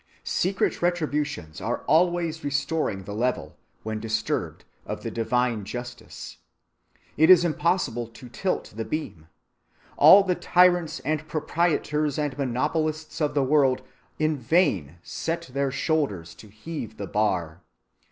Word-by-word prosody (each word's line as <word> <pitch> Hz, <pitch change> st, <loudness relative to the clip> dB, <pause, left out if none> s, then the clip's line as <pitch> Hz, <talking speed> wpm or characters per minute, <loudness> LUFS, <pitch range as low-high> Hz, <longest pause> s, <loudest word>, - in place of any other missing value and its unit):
Secret 190 Hz, +2 st, 0 dB
retributions 150 Hz, -, -2 dB
are -, -, -2 dB
always 170 Hz, -1 st, +2 dB
restoring 140 Hz, -7 st, -1 dB
the 100 Hz, -, -7 dB
level, 125 Hz, +4 st, -2 dB, 0.3 s
when 110 Hz, 0 st, -3 dB
disturbed, 110 Hz, 0 st, -2 dB, 0.2 s
of -, -, -6 dB
the -, -, -4 dB
divine 120 Hz, -1 st, 0 dB
justice. 120 Hz, +4 st, -8 dB, 0.8 s
It 160 Hz, +3 st, +5 dB
is 175 Hz, -2 st, +8 dB
impossible 165 Hz, -8 st, 0 dB
to 115 Hz, +2 st, -13 dB
tilt 125 Hz, -, -3 dB
the 115 Hz, -, -3 dB
beam. 110 Hz, -, -5 dB, 0.7 s
All 200 Hz, +1 st, +9 dB
the 185 Hz, -2 st, +1 dB
tyrants 175 Hz, -2 st, +3 dB
and 155 Hz, 0 st, -2 dB
proprietors 150 Hz, -2 st, 0 dB
and 145 Hz, -3 st, -1 dB
monopolists 155 Hz, +5 st, -2 dB
of 145 Hz, -1 st, 0 dB
the 140 Hz, -, +3 dB
world 135 Hz, -2 st, +3 dB, 0.3 s
in 155 Hz, -1 st, +1 dB
vain 115 Hz, -, +1 dB
set 165 Hz, -5 st, -4 dB
their 140 Hz, 0 st, 0 dB
shoulders 140 Hz, -, -1 dB
to 110 Hz, -, -14 dB
heave 110 Hz, +2 st, -7 dB
the 100 Hz, -, -4 dB
bar. 90 Hz, -5 st, -1 dB
145 Hz, 130 wpm, -25 LUFS, 115-160 Hz, 0.8 s, All